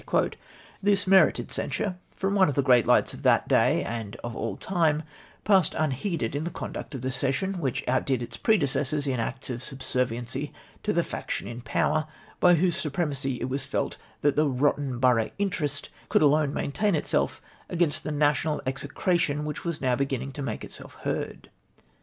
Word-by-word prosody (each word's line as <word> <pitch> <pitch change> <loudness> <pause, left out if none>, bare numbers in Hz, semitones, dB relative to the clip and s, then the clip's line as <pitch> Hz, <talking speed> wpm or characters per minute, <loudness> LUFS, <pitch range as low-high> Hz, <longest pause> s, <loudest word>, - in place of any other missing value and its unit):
'" - - -23 0.3
This 200 0 +3
merited 190 0 +4
censure 190 -4 -2 0.2
from 195 +1 -1
one 190 -5 +4
of 140 - -2
the 140 - +2
great 125 -4 +5
lights - - +4
of - - -9
that - - +3
day - - +3
and 115 -2 -5
of 120 -1 -5
all 110 -4 -3
time, 160 -5 +1 0.4
passed 190 -6 +4
unheeded 155 - -1
in 145 - -1
the 170 - -2
conduct 155 - -6
of 130 - -5
the 130 - -1
session, 140 +9 0
which 135 -7 -2
outdid 130 -1 +1
its - - -7
predecessors 145 - +2
in 130 -3 -1
acts 130 +3 -3
of 120 0 -4
subserviency 130 0 -2 0.3
to - - 0
the - - +2
faction - - -4
in 120 +1 -7
power 155 +5 0 0.3
by 175 -1 +6
whose 175 +1 +2
supremacy 140 -6 -1
it 125 - -1
was 135 +1 -2
felt - - -2 0.2
that 145 -1 +3
the 150 0 +3
rotten 135 0 0
borough 120 -3 +3
interest 170 -8 -1 0.2
could - - +4
alone 150 0 +4
maintain 190 +8 0
itself 150 - 0 0.3
against 165 -3 +1
the 155 - -3
national 150 +1 +1
execra 155 +6 0
tion 150 -3 0
wdiich 150 -1 -4
was 170 -3 -3
now 130 -2 +2
be£>innino: 135 0 -2
to 145 - -6
make 140 - -4
itself - - -6
heard. - - -4
145 Hz, 180 wpm, -27 LUFS, 130-165 Hz, 0.4 s, by